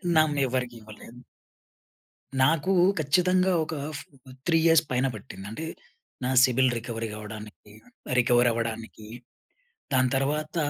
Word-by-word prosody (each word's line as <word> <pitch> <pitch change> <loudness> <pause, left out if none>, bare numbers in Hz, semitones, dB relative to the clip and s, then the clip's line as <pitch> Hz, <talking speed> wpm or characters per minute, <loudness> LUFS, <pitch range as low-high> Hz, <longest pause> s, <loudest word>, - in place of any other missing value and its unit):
నన్ను 155 -2 +3
ఎవరికీ 125 -1 -2
ఇవ్వలేదు. 110 +2 -13 1.2
నాకు 160 +6 +2 0.3
ఖచ్చితంగా 180 +5 +2
ఒక 155 - -6 0.2
ఫ్ - - -7 0.5
3 165 -1 +4
ఇయర్స్‌ 165 -1 +5
పైన 125 +1 +1
పట్టింది. 100 -2 -10
అంటే 155 +9 -5 0.6
నా 130 - 0
సిబిల్ 130 0 +3
రికవరీకి 115 -1 -5
గావ్వడానికి 105 0 -10 0.5
రికవరీ 120 0 +4
అవ్వడానికి. 115 -1 -5 0.9
దాని 130 -1 +3
తర్వాత 150 +4 -2
130 Hz, 110 wpm, -26 LUFS, 115-155 Hz, 1.2 s, ఇయర్స్‌